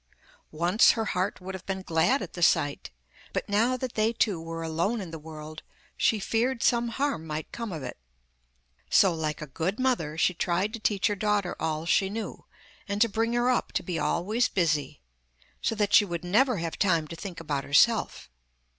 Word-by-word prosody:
Once 175 +7 +5
her 225 -1 -2
heart 185 0 -1
would 185 +1 -7
have 185 -1 -9
been 190 -1 -3
glad 170 - +2
at - - -9
the 175 - -7
sight, 145 -3 +2 0.4
but - - -2
now 230 +5 +2
that 255 -1 -4
they 215 +1 +2
two 205 -7 0
were 165 0 -5
alone 170 +8 -1
in 185 -5 -6
the 160 - -7
world 155 0 -9 0.3
she 220 - +2
feared 235 +4 0
some 240 -1 +3
harm 235 - -2
might 155 0 -5
come 230 -3 -5
of 160 -5 -5
it. - - -7 0.9
So, 190 -3 +5
like 155 -2 -3
a - - -5
good 165 - -3
mother, 235 - 0
she 180 - +3
tried 180 +4 -1
to 230 - -5
teach 205 -2 0
her 210 -2 +2
daughter 205 -2 0
all 160 0 -2
she 190 +3 +2
knew, 220 +2 -6 0.4
and 200 0 -2
to 230 - +5
bring 225 +2 -1
her 240 +1 +2
up 250 - -1
to - - -1
be 175 -4 -3
always 205 +10 +1
busy, 155 - -1 0.6
so 225 - 0
that 205 -1 0
she 210 - +8
would 175 -4 -4
never 230 +7 +3
have 165 -1 -4
time 170 -6 +2
to 165 - -6
think 180 0 -7
about 145 -4 -2
herself. 150 - +2
190 Hz, 200 wpm, -27 LUFS, 165-225 Hz, 0.9 s, she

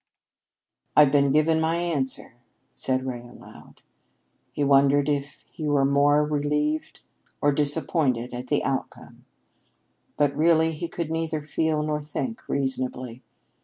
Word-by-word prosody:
"I've 150 -2 +7
been 140 -1 +3
given 155 +3 +3
my 160 +1 +1
answer," 155 -9 -2 0.4
said 130 0 -1
Ray 125 -2 -4
aloud. 120 0 -15 0.7
He 145 - -2
wondered 140 0 +4
if 145 -1 -3
he 155 - -6
were 145 -2 +3
more 145 +2 +3
relieved 150 +1 -1 0.4
or 145 - +3
disappointed 140 -4 0
at 125 +1 -6
the 145 - +1
outcome. 135 - -5 0.9
But 145 -1 +2
really 160 +1 +3
he 160 +2 -5
could 165 -1 -5
neither 160 -2 -2
feel 155 0 0
nor 150 0 -2
think 225 - -5
reasonably. 130 -2 -3
145 Hz, 130 wpm, -25 LUFS, 135-155 Hz, 0.9 s, I've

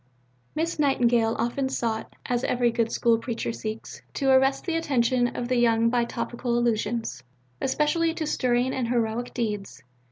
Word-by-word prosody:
Miss 325 +1 -1
Nightingale 240 -5 +3
often 245 +4 -1
sought, 230 -4 -2
as 245 0 -1
every 240 -1 +2
good 230 -1 0
School 230 -2 +2
Preacher 230 -1 -3
seeks, 220 0 -6
to 270 -1 +2
arrest 265 +1 +3
the 335 - -1
attention 255 -6 +2
of 240 - -3
the 250 0 +1
young 230 -1 +3
by 240 -1 +2
topical 240 +1 -2
allusions, 230 - -1 0.4
especially 305 +4 +1
to 315 - -2
stirring 250 -2 +1
and 255 -3 -1
heroic 235 0 -1
deeds. 210 - -4
240 Hz, 155 wpm, -26 LUFS, 230-265 Hz, 0.4 s, Nightingale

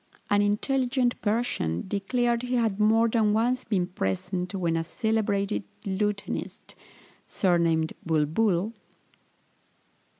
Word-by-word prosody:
An 205 0 +4
intelligent 245 +4 +1
Persian 210 - -1
declared 235 +5 0
he 250 0 -2
had 225 -4 +1
more 225 +2 +4
than 220 -2 +2
once 245 +4 +1
been 195 -5 0
present, 180 - -3
when 170 -3 0
a 165 - 0
celebrated 200 - -1 0.2
lutenist, 200 +1 -3 0.5
surnamed 170 -4 +1
Bulbul 170 +6 +1
(i. - - -33
205 Hz, 105 wpm, -27 LUFS, 180-230 Hz, 0.5 s, An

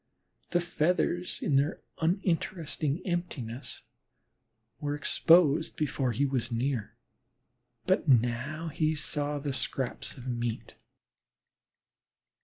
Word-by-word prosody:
The 175 - +2
feathers 175 +1 0
in 140 - +3
their 145 +4 +1 0.2
uninteresting 165 -3 0
emptiness 145 -9 -4 1.0
were 145 -1 -2
exposed 160 0 +4
before 135 -4 0
he 135 +5 +1
was 130 -3 -1
near, 120 -2 -1 0.9
but 185 -2 +2
now 130 +6 +2
he 155 +1 +1
saw 150 -1 0
the 140 -1 -3
scraps 130 +1 -3
of 130 0 -9
meat. 120 -2 -3
145 Hz, 95 wpm, -30 LUFS, 130-165 Hz, 1.0 s, exposed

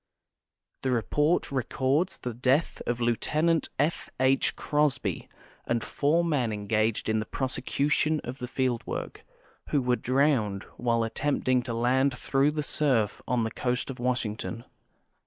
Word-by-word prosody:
The 130 - -1
report 145 +8 +1
records 135 +6 0
the 125 - -5
death 130 +7 +1
of 120 0 0
Lieut. 120 -1 0 0.5
F. 150 +5 0
H. 130 +1 +3
Crosby 150 -1 0 0.4
and 120 -1 0
four 150 +8 +1
men 135 -9 +1
en 105 -1 -4
gaged 110 +1 +1
in 110 0 +2
the 110 - -3
prosecution 140 +4 0
of 130 +3 -6
the 125 - -4
field 125 -2 0
work, - - -5 0.5
who 145 - +2
were 125 -1 +2
drowned 125 -7 +1
while 115 -1 +1
attempting 130 +2 +1
to 120 -1 -4
land 130 +3 +2
through 135 +3 +2
the 150 0 -2
surf 125 -9 +1
on 125 -2 +1
the 110 - -2
coast 125 +3 -1
of 130 - -10
Washington. 120 -2 -2
125 Hz, 145 wpm, -28 LUFS, 115-140 Hz, 0.5 s, H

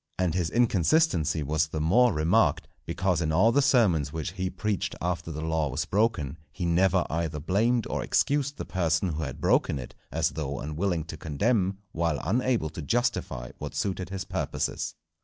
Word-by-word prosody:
And 90 -3 +1
his 85 -2 0
inconsistency 110 - +2
was 75 +2 +1
the 80 0 -4
more 115 +11 +4
remarked, 80 -2 +2 0.2
because 85 +1 0
in 80 -1 0
all 100 +8 +4
the 140 - +3
sermons 100 - +3
which 80 +1 -4
he 95 0 -3
preached 105 0 -2
after 85 -1 -2
the 80 0 -5
law 80 -2 0
was - - -2
broken, 95 - 0
he 85 - -4
never 90 +2 +3
either 80 -2 -2
blamed 110 +9 +1
or - - -2
excused 145 0 +1
the - - -5
person 85 0 0
who 80 -1 -3
had 70 -1 -5
broken 105 - +2
it, 65 -2 -8 0.2
as - - +1
though 70 -3 -4
unwilling 80 +3 -1
to 80 0 -8
condemn, 95 - 0
while 85 -3 0
unable 120 -7 +1
to 80 - -6
justify 95 - -1
what - - -6
suited 95 -2 -2
his 95 -1 -4
purposes. - - -3
85 Hz, 175 wpm, -27 LUFS, 80-105 Hz, 0.2 s, more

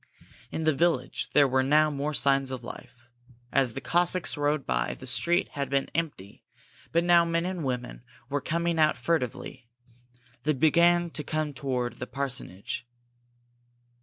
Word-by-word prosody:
In 160 - -3
the 155 0 +3
village, 165 -3 0
there 145 -1 +6
were 130 0 +2
now 150 +3 +4
more 145 +1 -2
signs 135 -1 +2
of 130 -2 -5
life. 120 0 -10 0.5
As 130 -4 +2
the 135 - -5
Cossacks 175 +3 +1
rode 145 -1 0
by, - - -1
the - - -11
street 175 0 +1
had 140 -2 -4
been 135 0 0
empty, 145 - -4 0.5
but 170 +1 +2
now 175 -1 +6
men 170 0 0
and 180 -3 -3
women 125 -2 -4 0.2
were 145 +1 -2
coming 170 +3 -1
out 155 -3 +4
furtively. 130 -2 -2 0.7
They 155 +4 +1
began 170 +4 +3
to 150 - -3
come 155 -1 -2
toward 125 -2 -3
the 125 - -5
parsonage. 125 -6 -4
145 Hz, 155 wpm, -27 LUFS, 130-165 Hz, 0.7 s, there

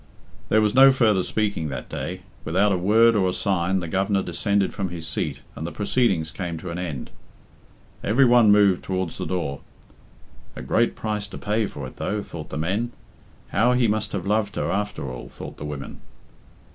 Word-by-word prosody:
There 110 - +4
was 105 -1 +2
no 135 +1 +8
further 110 -7 +3
speaking 100 -6 -1
that 65 - -5
day. 90 0 -5 0.2
Without 95 +5 +2
a - - +3
word 110 +5 +5
or 95 -3 +3
a - - -2
sign 95 -1 0
the 85 - -4
Governor 95 +3 +1
descended 100 +3 0
from 100 -3 -3
his 85 -2 -6
seat - - -3
and 75 - -6
the - - -5
proceedings 100 -7 +1
came 85 -3 -4
to 85 +2 -6
an 85 - -4
end. 80 -8 -5 0.9
Every 125 +6 +4
one 120 -3 +6
moved 100 -3 +4
towards 95 -3 -3
the - - -3
door. 85 -7 -2 0.9
"A - - -7
great 115 - +1
price 105 -2 -3
to - - -9
pay 105 +1 0
for 70 -6 -7
it, 65 - -10
though," 105 0 -2
thought 80 -4 -8
the - - -5
men. 100 +10 -1 0.6
"How 115 +6 +3
he 125 -2 +3
must 110 0 -1
have 95 -3 -3
loved 105 0 0
her, - - -1
after 105 -8 -2
all," 65 -1 -7
thought - - -9
the 75 - -6
women. 70 -2 -7
100 Hz, 195 wpm, -24 LUFS, 85-105 Hz, 0.9 s, no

